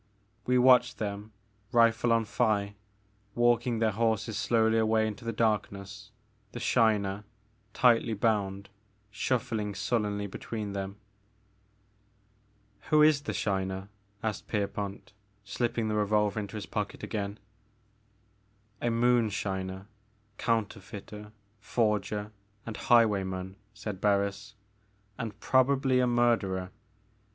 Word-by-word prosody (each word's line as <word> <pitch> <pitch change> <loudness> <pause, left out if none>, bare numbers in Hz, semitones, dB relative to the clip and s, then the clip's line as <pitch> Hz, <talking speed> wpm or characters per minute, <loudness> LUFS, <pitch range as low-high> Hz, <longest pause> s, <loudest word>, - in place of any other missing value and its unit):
We 125 0 +3
watched 125 -1 +5
them, 105 0 -4 0.4
rifle 115 0 +4
on 115 -1 +3
thigh, 105 -3 0 0.6
walking 120 0 +2
their 110 -1 +2
horses 110 0 0
slowly 115 0 +2
away 110 0 +2
into 110 +2 -5
the 115 - -2
darkness, 105 -2 -2 0.4
the 120 - -5
Shiner, 105 -5 +2 0.5
tightly 120 -4 +4
bound, 100 -2 0 0.4
shuffling 105 -2 -1
sullenly 105 -2 -1
between 105 +1 -5
them. 100 0 -4 1.9
Who 155 0 +6
is 150 -2 +5
the - - -4
Shiner? 95 -1 -2 0.3
asked 110 -2 -3
Pierpont, 100 -2 -3 0.3
slip 120 +4 -2
ping 115 -2 0
the 105 - -1
revolver 105 0 +1
into 105 0 -5
his 105 - -5
pocket - - -4
again. 100 -1 -3 1.4
A 120 - +1
moonshiner, 105 -5 0 0.5
counterfeiter, 105 -1 -3 0.3
forger, 105 -2 -1 0.3
and 115 - -5
highwayman, 95 -5 +2 0.2
said 105 -3 -6
Barris, 100 0 0 0.6
and 110 -2 -5
probably 130 0 +3
a 125 - +3
murderer. 115 -7 +1
105 Hz, 105 wpm, -29 LUFS, 100-115 Hz, 1.9 s, Who